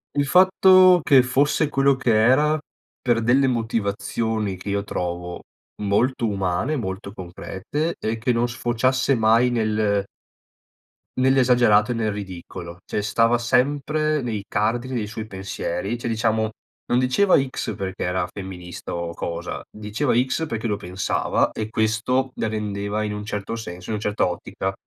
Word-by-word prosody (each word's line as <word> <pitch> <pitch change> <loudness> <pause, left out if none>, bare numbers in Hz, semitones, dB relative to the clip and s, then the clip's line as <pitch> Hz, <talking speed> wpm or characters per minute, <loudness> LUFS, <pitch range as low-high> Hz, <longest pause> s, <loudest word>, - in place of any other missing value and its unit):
Il 145 0 +1
fatto 185 +1 +6
che 135 -4 +5
fosse 140 +4 +2
quello 140 -1 +3
che 125 -4 +1
era 130 +8 +4 0.5
per 120 -3 +1
delle 130 +4 +4
motivazioni 110 -3 -1
che 95 +3 -7
io 100 0 0
trovo 90 -2 -4 0.4
molto 115 +4 +1
umane, 100 - -1
molto 100 -5 -4
concrete 95 - -4
e 110 +1 -2
che 120 +3 +1
non 120 0 +1
sfociasse 120 +3 +1
mai 115 +2 +4
nel 110 -3 +1 1.1
nell'esagerato 125 -4 +4
e - - +1
nel 110 -2 -1
ridicolo. 90 -3 -8
Cioè, 105 - -2
stava 115 +3 +3
sempre 145 +5 +1
nei 110 -4 -3
cardini 120 +5 -1
dei 110 -3 -1
suoi 110 +1 -6
pensieri, 95 0 -4
cioè, 120 - -4
diciamo 110 -1 +1 0.4
non 120 - +2
diceva: 130 +11 +4
"X" 130 -5 -3
perché 95 -1 -4
era 90 +1 -1
femminista 90 -3 -7
o 85 -1 -4
cosa 85 0 -5
diceva: 110 +5 -2
"X" 130 +6 +1
perché 115 -5 -4
lo 105 -3 +1
pensava 95 -1 -1
e 110 0 -4
questo 115 +4 0
la - - -1
rendeva 105 -1 -2
in 105 -1 -2
un 105 0 -6
certo 105 +1 -4
senso 90 -5 -8
in 110 - -1
un - - -7
certo 105 -2 +1
ottica 95 +2 -4
110 Hz, 150 wpm, -23 LUFS, 100-130 Hz, 1.1 s, fatto